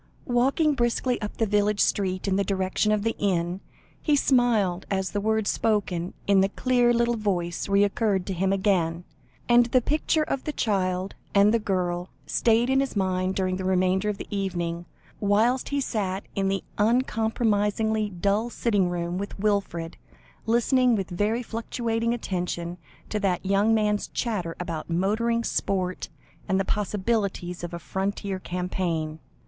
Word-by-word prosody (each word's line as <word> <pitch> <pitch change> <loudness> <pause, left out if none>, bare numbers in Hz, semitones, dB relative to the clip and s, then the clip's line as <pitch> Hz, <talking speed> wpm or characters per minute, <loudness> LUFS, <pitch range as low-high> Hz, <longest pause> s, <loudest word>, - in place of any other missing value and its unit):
Walking 270 +5 +2
briskly 245 -1 0
up 210 - -5
the 225 - +2
village 210 0 +1
street 185 -1 +1
in 190 - +2
the 200 - +2
direction 195 +2 0
of 210 -1 +1
the 225 0 0
inn, 180 -2 0 0.4
he 300 - +3
smiled, 230 -10 +2
as 190 -1 -1
the 205 - -1
words 220 0 +1
spoken 190 -5 -1
in 200 -1 +4
the 195 - +2
clear 245 +2 +2
little 235 0 +2
voice 180 -4 -2
recurred 200 -1 +2
to 195 - -3
him 190 +2 0
again, 180 -4 +1 0.4
and 240 0 +5
the 255 +2 +4
picture 305 +4 +1
of 275 -3 -3
the 300 - -3
child 185 -4 0 0.2
and 200 +2 +6
the 230 - +3
girl 180 -3 -1 0.2
stayed 230 +1 +2
in 265 +1 +3
his 275 -3 -1
mind 185 -1 0
during 185 -1 0
the 190 - -4
remainder 185 +2 +2
of 205 - -2
the - - -6
evening, 175 -3 -2 0.3
whilst 220 +5 +2
he 285 - 0
sat 200 -7 -2
in 195 -1 0
the 195 0 -1 0.2
uncompromisingly 220 -2 +1
dull 200 +5 0
sitting 205 -6 +1
room 175 +1 -2
with 200 - -5
Wilfred, 195 -5 -1 0.5
listening 240 +1 +3
with 195 -2 -3
very 210 +7 0
fluctuating 230 0 -2
attention 180 -5 -3 0.3
to 210 - -1
that 190 -2 0
young 200 +3 +3
man's 210 -1 +1
chatter, 185 -9 -2
about 170 -3 -4
motoring, 220 +7 +1
sport, 185 -4 -1 0.4
and 190 - +2
the 195 - 0
possibilities 200 -4 -1
of 175 - -4
a 170 - -4
Frontier 190 +2 -3
campaign. 175 -4 -3
200 Hz, 155 wpm, -26 LUFS, 185-225 Hz, 0.5 s, and